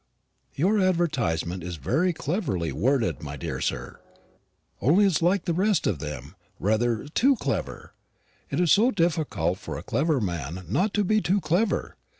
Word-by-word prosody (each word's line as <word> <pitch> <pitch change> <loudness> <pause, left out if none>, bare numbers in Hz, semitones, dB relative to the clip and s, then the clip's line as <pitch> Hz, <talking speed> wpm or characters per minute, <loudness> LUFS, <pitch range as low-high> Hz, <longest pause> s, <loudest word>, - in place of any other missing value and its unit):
Your 195 +9 +2
advertisement 135 - 0
is 90 +1 -5
very 155 - +1
cleverly 140 - -2
worded, 125 - 0
my 70 -2 -6
dear - - -4
sir; - - -3 0.8
only 175 - +4
it's 185 -6 +2
like 180 +2 +2
the 170 - 0
rest 195 +1 +1
of 85 - 0
them, 75 +1 -7 0.2
rather 110 +4 0
too 265 - +3
clever. - - -4 0.6
It - - -2
is 175 -3 +3
so 225 +5 +5
difficult 160 - 0
for - - -6
a - - -7
clever 150 -1 +1
man 85 - -4
not 190 - 0
to 210 - +2
be 215 +2 +2
too 195 +2 +1
clever. 190 +5 0
155 Hz, 155 wpm, -26 LUFS, -, 0.8 s, so